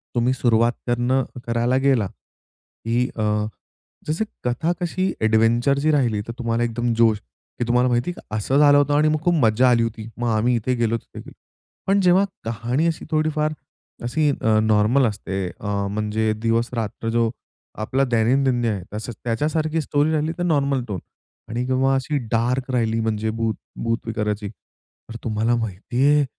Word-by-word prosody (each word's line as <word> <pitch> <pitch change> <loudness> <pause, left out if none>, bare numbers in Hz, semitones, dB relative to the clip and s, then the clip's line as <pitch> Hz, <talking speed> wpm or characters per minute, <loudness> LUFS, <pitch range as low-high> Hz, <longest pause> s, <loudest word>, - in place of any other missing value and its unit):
तुम्ही 120 +2 +2
सुरुवात 120 -1 +2
करणं 120 +2 +1 0.2
करायला 120 +2 +1
गेला, 135 -6 +2
की 120 +5 -5
अ, - - -2 0.9
जसं 155 +8 0 0.2
कथा 125 +8 0
कशी 185 +2 0
एडव्हेंचरची 120 +7 +3
राहिली, 120 -8 +1
तर - - -4
तुम्हाला 115 0 0
एकदम 120 0 -1
जोश, 110 -2 +4 0.4
की 120 - 0
तुम्हाला 125 +1 +3
माहिती 120 +6 +1
आहे - - -7
का 105 - -8
असं 130 +6 0
झालं 145 -1 +7
होतं 145 0 +3
आणि 155 +1 +4
मग 155 - +1
खूप 175 - +3
मज्जा 115 +2 +4
आली 115 -1 +4
होती. 110 -1 -4
मग 120 0 -2
आम्ही 120 +3 +2
इथे 120 +3 0
गेलो 115 -1 +1
तिथे - - -13
गेलो. - - -11 0.5
पण 200 +1 +3
जेव्हा 185 +1 +5 0.2
कहाणी 115 +7 -1
अशी 165 - -2
थोडीफार 155 0 +1 0.5
अशी 145 +6 +1
अ, 110 -4 +2
नॉर्मल 110 +5 +3
असते 95 -3 -3
अ, 100 -1 -2
म्हणजे 110 +1 -1
दिवस-रात्र 115 -1 -1
जो 115 0 +2 0.5
आपला 135 +5 +1
दैनंदिन 125 +1 +2
आहे. 100 -5 -1 0.4
त्याच्यासारखी 155 +6 0
स्टोरी 145 +2 +1
राहिली 155 +1 0
तर 175 - -2
नॉर्मल 140 -6 +1
टोन 95 -4 -3 0.5
आणि 120 +2 -2
किंवा 130 +1 +2
अशी 135 +3 -1
डार्क 125 +3 0
राहिली 115 -2 +1
म्हणजे 110 -1 -1
भूत 110 -1 -1 0.3
भूत 115 0 +1
विकाराची. 105 -2 -2
तर 115 +1 -18
तुम्हाला 115 +1 +1
माहिती 115 +4 -1
आहे 150 -1 +4
120 Hz, 160 wpm, -22 LUFS, 110-140 Hz, 0.9 s, झालं